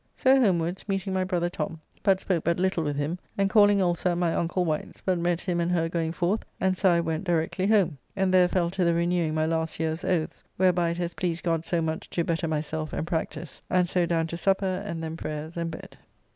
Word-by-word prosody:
So 265 +1 +4
homewards, 175 -4 +1
meeting 195 0 -1
my 185 0 +1
brother 180 -2 0
Tom, 165 -2 -4 0.2
but 195 -2 +3
spoke 180 -5 -1
but 170 +1 +1
little 185 -3 +1
with 145 -2 -1
him, 150 +5 -2 0.2
and 195 -1 +1
calling 205 -2 +5
also 175 0 +1
at - - -2
my 175 -2 +1
uncle 175 +2 0
Wight's, 155 -2 -3
but 185 -2 0
met 175 0 +1
him 175 -2 -1
and 170 +1 0
her 165 -2 +1
going 165 -1 -1
forth, 175 +5 0 0.2
and 190 0 +2
so 190 +1 +3
I 170 -1 +4
went 165 +1 -2
directly 175 +1 0
home, 190 -9 +3 0.2
and 190 -1 +1
there 180 -1 +6
fell 175 -1 0
to 185 0 0
the 170 -1 +3
renewing 170 -2 +1
my 155 0 +1
last 160 0 -1
year's 160 +2 -1
oaths, 170 -4 -1
whereby 180 -2 +3
it 170 - -3
has 175 -1 -2
pleased 175 -2 -2
God 165 -1 0
so 170 -1 +1
much 160 0 -3
to 170 - -1
better 165 0 -1
myself 155 0 -3
and - - -2
practise, 165 -2 -4
and 180 -1 +3
so 175 0 +1
down 165 -1 +1
to 170 +1 -5
supper, 190 0 +1
and 170 -5 -5
then 160 0 -4
prayers 155 +1 -5
and 170 -1 -2
bed. 160 - -9
170 Hz, 235 wpm, -27 LUFS, 165-185 Hz, 0.2 s, there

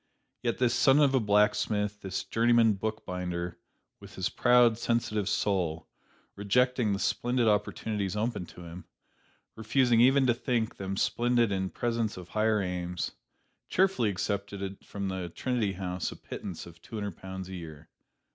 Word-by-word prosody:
Yet 120 -1 -1
this 125 -2 +2
son 135 +2 +5
of 140 -2 +4
a 130 - +4
blacksmith, 105 -1 +1
this 95 -1 -3
journeyman 115 -1 +3
book 110 +2 -4
binder, 90 -1 -4 0.4
with - - -13
his - - -1
proud, 120 -2 +4
sensitive 110 -4 0
soul, 90 -7 0 0.5
rejecting 120 +3 +2
the 100 - 0
splendid 120 +3 0
opportunities 105 -1 0
open 105 -4 -2
to 90 - -12
him 85 +2 -9 0.7
refusing 115 +1 +3
even 135 +2 +5
to 120 - +4
think 120 -2 -1
them 95 0 -4
splendid 120 -1 +2
in 95 -1 -1
presence 115 -2 -2
of 90 -1 -9
higher 110 0 +1
aims 90 -1 -3 0.6
cheerfully 185 - +2
accepted 100 0 -3
from 100 -1 -5
the 95 -2 -4
Trinity 115 +1 -1
House 90 -1 -3
a - - -8
pittance 95 -5 -7
of 85 -1 -14
two - - -10
hundred 105 -4 -4
pounds 95 -1 -7
a 95 - -8
year. 80 -5 -9
105 Hz, 155 wpm, -29 LUFS, 95-120 Hz, 0.7 s, son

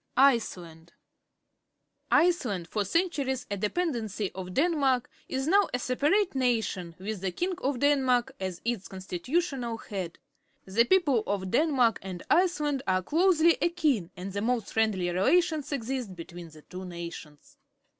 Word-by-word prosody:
ICELAND 180 -11 +2
^,M - - -21 1.2
Iceland, 245 - +2
for 210 +2 -1
centuries 270 - 0
a 200 - -1
depeudencj' 220 - -1
of 185 -1 -6
Denmark, 275 -6 +2 0.2
is 265 0 -2
now 395 +6 +4
a - - +1
separate 295 +11 +1
nation, 220 -10 -1
with 200 +1 -5
the 190 -1 -1
king 360 - -2
of 275 -4 -1
Denmark 265 -2 +2
as 185 -2 -4
its 235 -5 -2
constitutional 235 - -2
head. 190 -6 -6 0.5
The 215 +5 +3
people 290 -7 +3
of 190 -2 -2
Denmark 255 -6 +3
and 185 -2 -7
Iceland 300 -6 +2
are 185 0 +2
closely 335 - +3
akin, 300 - +1
and 185 +2 -6
the 200 - -2
most 230 -1 -1
friendly 215 -5 +1
relations 310 - +2
exist 250 -6 -3
between 175 0 -9
the 155 -1 -16
two 185 +1 -8
nations. 170 -4 -9
235 Hz, 140 wpm, -28 LUFS, 185-290 Hz, 1.2 s, now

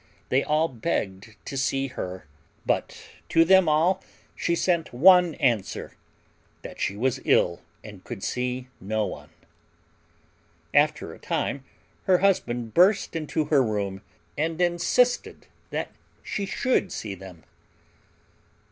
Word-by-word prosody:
They 130 +2 +2
all 155 +2 +2
begged 110 - -3
to - - -6
see 135 0 0
her, 95 -8 -6 0.4
but - - -1 0.3
to 165 0 +5
them 190 -1 +5
all 170 +5 +2 0.3
she 170 - 0
sent 170 -2 0
one 175 +4 +6
answer 115 -7 -1 0.7
that - - -9
she 100 - -1
was 130 +3 0
ill 85 0 +2 0.2
and 105 -4 -11
could 115 -6 -8
see 125 0 -2
no 110 +2 -1
one. - - -8 1.4
After - - +2
a - - -14
time 135 -1 -2 0.4
her 185 -1 +5
husband 120 - 0
burst 185 +1 +4
into 155 -1 -1
her 140 - +6
room, 100 -4 -2 0.3
and 160 +2 -2
insisted 180 +8 +1 0.2
that - - -3 0.3
she 200 -1 -3
should 245 -1 0
see 105 -3 -5
them. 95 -3 -12
135 Hz, 125 wpm, -25 LUFS, 110-175 Hz, 1.4 s, one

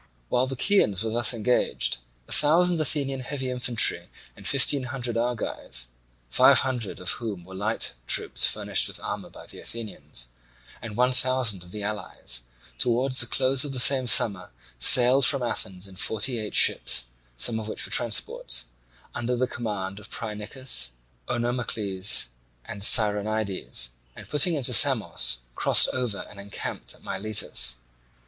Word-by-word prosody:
While 125 +1 0
the 135 - -5
Chians 115 - +1
were 110 - -4
thus 120 0 +2
engaged, 120 +1 0 0.3
a - - -15
thousand 170 +3 +3
Athenian 135 -2 -2
heavy 130 0 -5
infantry 125 -2 0 0.3
and - - -7
fifteen 140 -3 +2
hundred 120 -2 -4
Argives 115 - -4 0.4
(five - - +4
hundred 125 -6 -4
of 90 +1 -2
whom 100 -7 -7
were 95 - -13
light 105 +4 0
troops - - +1
furnished - - 0
with - - -7
armour - - -6
by - - -14
the - - -13
Athenians), 105 - -5 0.5
and 110 -2 -9
one 125 +1 +2
thousand 125 -7 +1
of 90 - -15
the 105 +2 -7
allies, 100 - -3 0.4
towards 130 +2 +1
the 120 - +4
close 130 +3 +1
of 145 -2 -4
the 130 - 0
same 130 0 +5
summer 100 -5 +4 0.3
sailed 125 - +7
from 125 +2 +2
Athens 95 -5 -5
in 95 -1 -14
forty 110 +4 0
eight 105 -1 -6
ships, - - +4 0.3
some 110 - +2
of 110 - -8
which - - 0
were - - -6
transports, - - +1 0.5
under 120 +1 -3
the 125 +1 -1
command 105 -5 -6
of 105 - -12
Phrynichus, 105 - -3 0.3
Onomacles, 110 - 0 0.4
and 105 -3 -9
Scironides, 105 - +3 0.3
and - - -13
putting 165 +3 +3
into 130 -3 +1
Samos 85 - +4
crossed - - +4
over 125 -6 -4
and 100 - -13
encamped 100 0 -6
at - - -21
Miletus. 95 - -1
115 Hz, 150 wpm, -24 LUFS, 100-130 Hz, 0.5 s, sailed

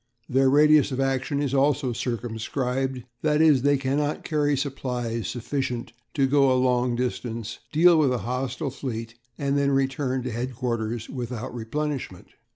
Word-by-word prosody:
Their 135 +1 +3
radius 150 +1 +5
of 130 - -3
action 135 +1 0
is 140 -2 -2
also 140 -2 +2
circumscribed 125 +2 -2 0.2
that 150 -1 +2
is, 155 -5 +5
they 145 +1 +3
cannot 140 +3 -1
carry 145 -2 +1
supplies 125 -5 -3
sufficient 125 -1 -3 0.2
to 135 - +3
go 135 0 +4
a 130 - +3
long 125 -1 +2
distance, 120 -2 -3
deal 165 +1 +6
with 140 -4 +3
a 125 - +1
hostile 130 +4 -2
fleet, 115 -4 -5 0.2
and 140 0 0
then 140 0 +2
return 135 -1 0
to 125 - -3
headquarters 120 -2 -3
without 125 -2 -5
replenishment. 125 -3 -4
130 Hz, 150 wpm, -25 LUFS, 120-140 Hz, 0.2 s, deal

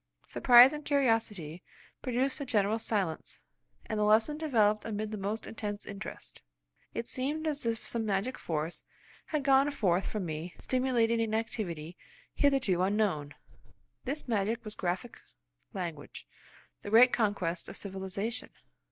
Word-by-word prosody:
Surprise 250 +2 +7
and 300 0 -6
curiosity 225 - 0 0.4
produced 260 +3 0
a - - 0
general 215 -1 +1
silence, 195 -8 -2 0.4
and 215 - -3
the - - +2
lesson 220 +8 +4
developed 220 -9 +2
amid 215 -1 -3
the - - -3
most 205 +3 -3
intense 205 -2 -5
interest. 200 -1 -8 0.5
It 230 - -2
seemed 290 +7 -2
as 295 -6 -2
if 225 -1 -2
some 230 -1 -1
magic 210 +4 -1
force 160 +1 -3 0.4
had 305 -3 -1
gone 270 +1 +5
forth 190 -9 +1
from 210 -4 -3
me 160 +2 -5
stimulating 240 -3 +1
an 220 -1 0
activity 180 -7 -3 0.4
hitherto 265 - +2
unknown. 185 -7 0 0.7
This 280 +3 -4
magic 225 +1 -1
was 215 - -4
graphic 185 +6 -3 0.5
language, 170 -6 -6 0.5
the - - -6
greatest 240 +4 +7
conquest 195 -7 0
of - - -8
civilisation. 195 +3 -4
215 Hz, 135 wpm, -31 LUFS, 190-250 Hz, 0.7 s, Surprise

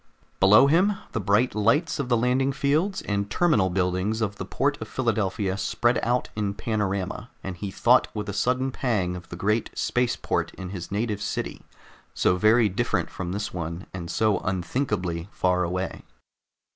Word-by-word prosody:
Below 105 +7 +7
him 180 +8 +4 0.2
the 115 - -2
bright 105 +5 +2
lights 145 - +2
of 135 -3 -2
the 120 - +4
landing 125 +3 +2
fields 155 +10 0
and 100 0 -1
terminal 110 - +3
buildings 90 +4 0
of 100 -2 -2
the - - -5
port - - -1
of - - -5
Philadelphia 100 -5 -1
spread 120 +2 +1
out 125 +2 0
in 100 -2 -2
panorama, 105 0 -2
and 95 -1 -4
he 100 +3 -5
thought 95 - +4
with 105 -1 -3
a 100 - -3
sudden 130 +5 0
pang 105 -9 -1
of 90 -1 -10
the - - -6
great 105 +5 0
space 125 -1 +1
port - - -2
in 95 -1 -7
his 90 -2 -7
native 105 0 -1
city, - - -3 0.5
so 90 - +3
very 110 +4 +4
different 95 - -1
from 90 -1 -5
this 105 +2 -3
one 85 +1 -5
and 85 -2 -6
so 110 -2 +2
unthinkably 95 -2 -2
far 90 0 +1
away. 90 +2 -3
105 Hz, 170 wpm, -25 LUFS, 95-120 Hz, 0.5 s, Below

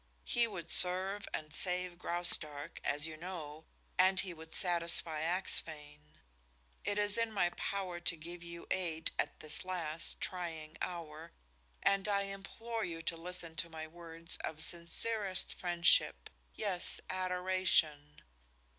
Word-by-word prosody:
He 235 -1 +3
would 170 -6 -3
serve 190 +3 +4
and 155 -1 -5
save 180 0 -2
Graustark, 165 -5 0
as 145 +1 +2
you 160 -1 -4
know, 160 -3 -7 0.3
and 190 +1 +6
he 185 -2 -1
would 160 0 -12
satisfy 170 -3 +3
Axphain. 150 -4 -2 0.7
It 205 +1 -1
is 205 +1 +2
in 230 -1 +1
my 175 -4 +2
power 185 -1 -3
to 175 0 +2
give 170 +2 -8
you 170 0 -8
aid 165 -4 -1
at 145 - -1
this 155 +3 -2
last, 170 -3 -2
trying 165 -4 -4
hour, 165 -2 -5 0.5
and 195 +1 +3
I 200 -1 +2
implore 220 +4 -5
you 165 -3 -4
to 165 - 0
listen 170 -1 -4
to 170 - 0
my 160 -1 -6
words 165 0 -4
of 155 0 -2
sincerest 190 +3 +3
friendship, 170 - +3 0.2
yes, 190 -4 -2
adoration. 180 -5 +1
175 Hz, 135 wpm, -35 LUFS, 160-185 Hz, 0.7 s, and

